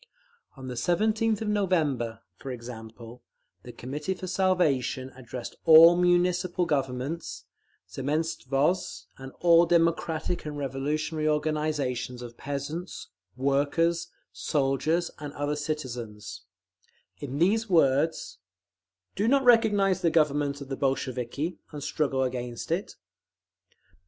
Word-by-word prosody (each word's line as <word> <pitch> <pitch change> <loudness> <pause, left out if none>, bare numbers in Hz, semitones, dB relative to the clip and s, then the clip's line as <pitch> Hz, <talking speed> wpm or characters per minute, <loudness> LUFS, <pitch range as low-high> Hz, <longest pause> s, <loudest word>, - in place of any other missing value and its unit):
On 130 -1 -8
the 125 - -4
17th 215 - +1
of - - -4
November, 155 - 0
for 135 - -9
example, 115 -1 -9 0.4
the - - -10
Committee 150 +9 -4
for 185 - -7
Salvation 170 -9 +1
addressed 125 -1 -8
"all 165 +1 +9
Municipal 180 0 +2
Governments, 140 +1 -3 0.4
Zemstvos, 150 +2 -1
and 135 0 -8
all 170 0 +6
democratic 165 0 +1
and 150 -1 -6
revolutionary 150 +3 -2
organisations 150 -5 -1
of 120 -1 -9
peasants, 145 +7 -5 0.3
workers, 145 +5 +1 0.3
soldiers 155 +4 0
and 145 -1 -7
other 145 0 -2
citizens," 120 - -5 0.7
in 140 -1 -5
these 210 +7 +2
words: 160 - +2 0.8
Do 205 +3 0
not 275 +2 +4
recognise 205 -6 +4
the 170 - +3
Government 145 -3 +1
of 140 - -8
the 135 - -2
Bolsheviki, 135 +4 -2
and 145 -2 -7
struggle 135 -4 0
against 125 -2 -4
it. - - -2
150 Hz, 110 wpm, -27 LUFS, 130-175 Hz, 0.8 s, all